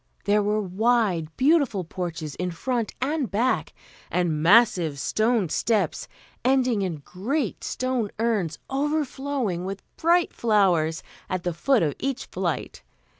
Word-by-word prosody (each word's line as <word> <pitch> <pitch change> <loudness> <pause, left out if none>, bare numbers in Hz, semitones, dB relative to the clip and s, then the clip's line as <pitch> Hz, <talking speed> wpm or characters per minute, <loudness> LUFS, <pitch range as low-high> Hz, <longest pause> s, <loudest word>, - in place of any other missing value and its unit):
There 210 +1 +3
were 210 +1 +1
wide, 205 -3 +1
beautiful 270 - +3
porches 165 -3 -5
in 180 0 -3
front 230 +7 -2
and 285 -3 -1
back, 235 +7 0 0.4
and 170 -4 0
massive 180 -5 +4
stone 215 - +1
steps, 215 +5 0 0.4
ending 255 -4 +2
in 165 -7 -3
great 235 +7 -2
stone 255 -4 -1
urns 210 -9 0
overflowing 275 - -1
with 195 +1 -5
bright 340 +1 +3
flowers 180 -8 +2 0.3
at 185 -2 -2
the 175 - -1
foot 230 +6 +2
of 150 -3 0
each 275 -1 -2
flight. - - -3
210 Hz, 125 wpm, -25 LUFS, 180-255 Hz, 0.4 s, massive